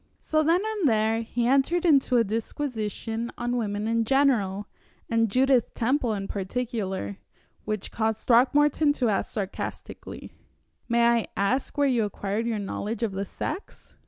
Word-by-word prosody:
So 310 0 0
then 330 +4 +3
and 425 -9 +1
there 220 0 +2
he 235 +1 -2
entered 275 +8 +2
into 275 -6 +4
a 230 - +5
disquisition 225 0 -3
on 240 0 -1
women 210 -2 -2
in 230 0 +1
general 220 -7 +2 0.4
and 230 -1 +2
Judith 255 +1 +2
Temple 245 -1 +1
in 195 -1 -4
particular, 195 - -3 0.5
which 215 -2 -3
caused 220 -1 -1
Throckmorton 290 +4 +4
to 250 -5 0
ask 200 - 0
sarcastically: 200 -2 -6 0.6
"May 235 0 +3
I 235 -1 +3
ask 245 +10 0
where 285 - +3
you 245 -4 +2
acquired 205 +2 -2
your 230 -2 -1
knowledge 210 +3 -4
of 225 - 0
the 195 +1 -3
sex?" 380 - -7
230 Hz, 150 wpm, -26 LUFS, 210-265 Hz, 0.6 s, a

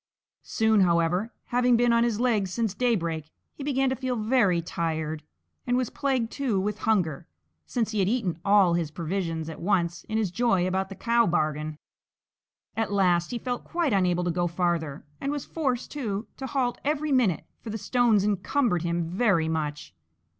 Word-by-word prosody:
Soon, 220 -1 +2
however, 175 +4 +2 0.2
having 245 -1 +4
been 240 0 +3
on 235 0 +4
his 230 -3 0
legs 220 -7 +1
since 225 -2 -1
daybreak, 170 -10 -1 0.2
he 280 - -8
began 270 -1 +1
to - - 0
feel 255 0 -2
very 215 -5 +2
tired, 160 -2 -3 0.5
and 245 0 +2
was 255 -3 -1
plagued 260 -5 -1
too 250 -9 0
with 210 +2 -2
hunger, 170 -10 +1 0.4
since 225 -3 -1
he 215 - -1
had 190 0 +2
eaten 205 -9 -1
all 200 -3 +5
his 170 -3 0
provision 165 0 -3
at 160 - -7
once 175 -2 0
in 220 - -2
his 210 -5 0
joy 195 -3 +2
about 190 +1 -1
the 195 - -8
cow 235 +2 +2
bargain. 155 -2 -1 1.0
At 225 -2 -1
last 180 -4 +2
he 245 - -3
felt 245 +1 -4
quite 335 -7 -1
unable 180 -2 +2
to 175 - 0
go 175 +1 0
farther, 170 -4 -1 0.2
and 275 - -1
was 290 -2 -3
forced, 265 -7 -2
too, 220 -7 -3
to 265 - -5
halt 255 -3 -1
every 300 +1 0
minute 230 - +2
for 230 - -9
the 220 - -3
stones 220 -1 +2
encumbered 205 - +1
him 170 0 -1
very 175 -1 +1
much. 150 - -3
205 Hz, 180 wpm, -26 LUFS, 170-245 Hz, 1.0 s, all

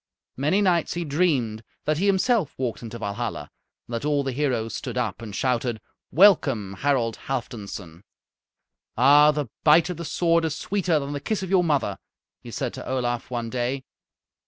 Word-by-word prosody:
Many 150 +10 +1
nights 175 -4 +2
he 175 0 -2
dreamed 140 -9 0 0.2
that 155 0 +1
he 200 - +1
himself 200 - +2
walked 125 -3 -3
into 120 0 -7
Valhalla, 110 +2 -4 0.3
and 120 - -10
that 115 - -2
all 145 -1 +1
the 135 - -2
heroes 125 -5 -1
stood 125 -2 -5
up 115 -4 -2
and 105 -3 -7
shouted: 120 -1 0 0.3
"Welcome! 140 - +4
Harald 125 -6 +1
Halfdanson!" 100 -9 -5 1.0
"Ah! 145 +4 +7
the 150 -1 0 0.2
bite 160 +3 +5
of 175 - -6
the 170 - -5
sword 165 +1 +2
is 160 -2 -1
sweeter 180 -2 0
than 140 0 -3
the 145 - -3
kiss 190 +7 -2
of 190 - -5
your 185 -2 +4
mother," 150 -5 0 0.4
he - - -10
said - - -3
to - - -8
Olaf 120 -2 -2
one 120 -2 -3
day. 125 +2 -2
140 Hz, 175 wpm, -24 LUFS, 120-165 Hz, 1.0 s, Ah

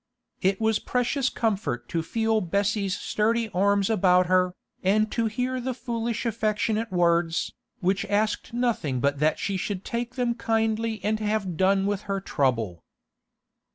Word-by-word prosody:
It 190 +1 +2
was 220 -1 +2
precious 255 +2 0
comfort 200 - -1
to 165 - 0
feel 220 +5 0
Bessie's 200 +1 0
sturdy 225 +1 0
arms 200 +1 +2
about 180 -4 +4
her, 185 0 +2 0.3
and 215 +3 +2
to 230 -1 +1
hear 250 +3 -2
the 255 0 -3
foolish 235 -1 -3
affectionate 220 0 0
words, 170 -2 +1 0.3
which 190 +2 +1
asked 210 +1 0
nothing 230 - 0
but 140 +2 +1
that 155 +1 +2
she 195 -1 -2
should 195 0 -4
take 240 +1 -3
them 245 -2 +1
kindly 225 -1 0
and 215 +2 0
have 210 -4 -1
done 195 +3 +3
with 205 -1 -1
her 195 0 0
trouble. 115 - -1
210 Hz, 150 wpm, -26 LUFS, 185-225 Hz, 0.3 s, about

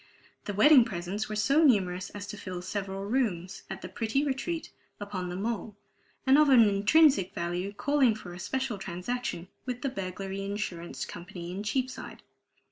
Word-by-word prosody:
The 205 - -3
wedding 265 +5 +8
presents 195 0 -4
were 215 - -3
so 275 +9 +3
numerous 185 - +3
as 205 -1 -7
to - - -5
fill 185 -3 -6
several 195 0 -4
rooms 200 -7 -1
at 190 0 -6
the - - -4
pretty 225 +8 -1
retreat 295 +4 -3 0.3
upon 200 -3 -4
the 175 - -4
Mole, 210 +1 -3 0.5
and 270 +2 +6
of 305 -1 +5
an 255 -3 +8
intrinsic 205 - +4
value 175 +3 -2
calling 260 +1 +2
for 180 -5 -9
a 175 - -9
special 235 +2 -2
transaction 180 +1 -4 0.2
with 250 0 -4
the 275 - +1
Burglary 195 -3 -5
Insurance 195 -4 -4
Company 175 0 -8
in 190 +2 -4
Cheapside. 255 +4 -3
205 Hz, 165 wpm, -29 LUFS, 185-250 Hz, 0.5 s, wedding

